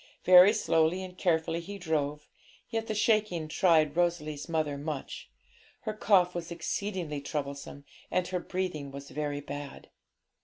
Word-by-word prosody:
Very 180 +2 +9
slowly 180 -4 +2
and 180 -1 -9
carefully 165 -2 +1
he 200 +4 -7
drove, 150 -4 -2 0.4
yet 225 0 -2
the 215 - -2
shaking 210 -7 +1
tried 155 -2 +3
Rosalie's 170 -3 -1
mother 155 -3 0
much. 145 -1 -6 0.5
Her 215 - -3
cough 190 -4 +3
was 175 -1 -5
exceedingly 170 -2 -3
troublesome, 140 -1 -5 0.2
and 180 0 0
her 185 -1 -1
breathing 175 -6 -3
was 140 +1 -9
very 145 -1 -3
bad. 145 0 -8
165 Hz, 140 wpm, -29 LUFS, 150-185 Hz, 0.5 s, Very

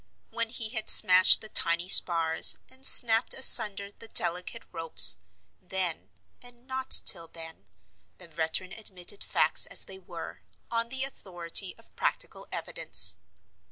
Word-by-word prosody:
When 230 -1 -5
he 225 -1 -8
had 220 -2 -6
smashed 185 +1 +5
the 215 - -11
tiny 170 -1 -1
spars, 165 -3 +3
and 260 +1 -3
snapped 225 0 +2
asunder 200 -6 +2
the 225 - -12
delicate 180 -4 -1
ropes—then, 175 +1 +1 0.3
and 245 0 -15
not 260 0 -8 0.2
till 165 -1 -1
then, 160 -11 -12 0.5
the 175 - -14
veteran 165 +3 -7
admitted 200 -2 -8
facts - - -1
as - - -3
they 380 - -14
were, - - -13 0.3
on 230 0 -4
the 265 +1 -6
authority 185 -7 -3
of 230 - -25
practical - - -7
evidence. - - +1
190 Hz, 130 wpm, -24 LUFS, 170-230 Hz, 0.5 s, smashed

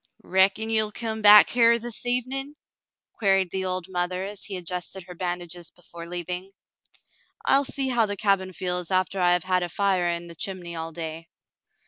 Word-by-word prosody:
"Reckon 195 +4 +2
ye'U 220 -1 +2
come 220 -1 -4
back 210 0 +8
hyar 235 -1 +5
this 240 +1 -5
evenin'.'*" 265 +4 -1 0.6
queried 195 -4 +2
the 190 0 -2
old 185 -1 -2
mother, 180 0 -2
as 200 0 -7
he 195 -3 -5
adjusted 180 +1 -6
her 180 - -11
bandages 175 -1 -5
before 170 -1 -12
leaving. 180 +2 -5 1.0
"I'll 275 +1 +4
see 270 -1 -1
how 235 -3 +2
the 205 0 -4
cabin 195 -2 +1
feels 180 -1 -3
after 185 +1 0
I 175 -1 +4
have 180 -2 +1
had 185 0 +1
a 175 - -3
fire 190 -1 +1
in 170 0 -2
the 170 - -10
chimney 175 0 -5
all 165 0 -5
day." 165 0 -7
185 Hz, 175 wpm, -25 LUFS, 175-210 Hz, 1.0 s, back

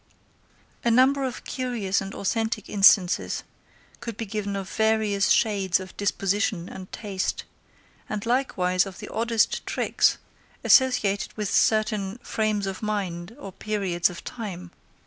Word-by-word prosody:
A 235 - +2
number 260 +4 +4
of 255 -2 -4
curious 235 -8 -1
and 195 0 -6
authentic 220 +1 -1
instances 195 -3 +4 0.6
could 230 -2 -6
be 225 - -3
given 205 -1 -3
of 195 -1 -4
various 215 -2 +1
shades 195 -4 +2
of 185 -1 -10
disposition 200 -1 0
and 185 0 -9
taste, 195 -4 -3 0.7
and 210 0 -3
likewise 195 -7 +1
of 190 -3 -9
the - - -8
oddest 230 -1 +1
tricks, - - +2 0.5
associated 215 -7 +3
with 210 -3 -2
certain 215 -2 +2
frames 215 -2 -1
of 195 -1 -5
mind 195 -2 -3
or 195 - -8
periods 190 -4 0
of 175 - -9
time. 180 -7 -7
205 Hz, 130 wpm, -25 LUFS, 190-225 Hz, 0.7 s, number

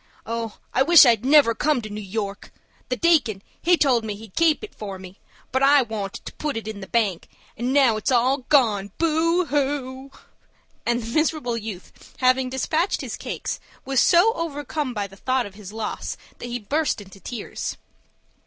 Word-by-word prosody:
Oh, 230 -1 -4 0.2
I 260 - +2
wish 330 +2 +8
I'd 230 -3 +3
never 275 -3 +6
come 295 +4 +1
to 215 - -6
New 210 +1 -5
York! 200 0 -5 0.4
The 250 - 0
deacon, 245 - +2 0.2
he 350 +1 +4
told 255 -7 +3
me 215 -2 -4
he'd 210 -2 -13
keep 330 +1 +3
it 430 - -8
for 200 -3 -7
me; 185 +1 -12 0.3
but 260 - +1
I 275 0 +6
wanted 210 -4 -6
to - - -7
put 300 -5 -3
it 225 - -6
in 215 -2 -5
the 190 - -8
bank, 205 -5 0 0.3
and 245 +3 -2
now 265 -5 +4
it's 215 - -1
all 255 +2 +3
gone, 215 -9 +3
boo 335 +2 +2
hoo!" 275 -2 -2 0.8
And 240 0 +1
the 230 +1 -6
miserable 310 -6 0
youth, 215 -5 -9
having 255 0 +3
despatched 310 +8 0
his - - -5
cakes, - - -5 0.3
was 270 -1 +1
so 360 +6 +5
overcome 290 - -3
by 205 -1 -1
the 195 0 -13
thought 255 +3 0
of 200 - -10
his 200 -1 -10
loss 220 0 -4 0.2
that 245 - -6
he 240 - -2
burst 285 +7 -1
into 195 -1 -13
tears. 230 +1 -5
245 Hz, 185 wpm, -23 LUFS, 215-290 Hz, 0.8 s, wish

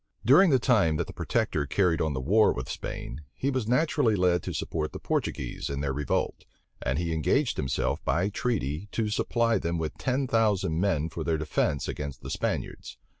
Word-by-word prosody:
During 160 - +7
the 135 - +5
time 105 -9 +3
that - - -1
the - - -10
protector 75 -2 -1
carried 90 +1 +2
on 80 -2 0
the - - -1
war 105 +11 +4
with 65 +1 -5
Spain, 75 - -6
he 140 - -1
was 130 -5 -2
naturally 125 -3 +2
led 90 -2 +2
to - - -5
support 75 -2 -3
the - - -6
Portuguese - - -2
in 70 0 -3
their 70 -2 -1
revolt; 75 0 -1 0.4
and 65 +2 -1
he 85 0 -1
engaged 115 - +1
himself 65 -2 -1
by 90 +7 +1
treaty 100 - -2
to 110 -2 0
supply 115 +1 +1
them 85 +1 -2
with 80 -2 -3
ten 130 +1 0
thousand 105 -9 +1
men 80 -6 +1
for 80 0 -5
their 80 0 0
defence 75 -1 -1
against 70 -3 -5
the - - -6
Spaniards. - - -3
85 Hz, 190 wpm, -27 LUFS, 75-115 Hz, 0.4 s, During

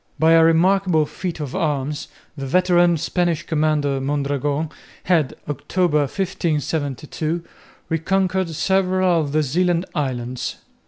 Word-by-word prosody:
By 160 +1 +4
a 165 0 +7
remarkable 170 0 +3
feat 175 +2 -5
of 145 -1 -5
arms 150 -4 -1 0.3
the 135 -2 -5
veteran 175 +1 +3
Spanish 170 +1 0
commander 150 -3 +1
Mondragon 145 +2 -1 0.3
had, 165 -7 +1
October, 150 +3 0
1572, 155 -1 -2 0.4
reconquered 185 +2 0
several 185 +1 +2
of 145 -2 -3
the 155 +1 +2
Zeeland 175 +5 +1
islands. 125 -3 -3
160 Hz, 110 wpm, -21 LUFS, 145-180 Hz, 0.4 s, a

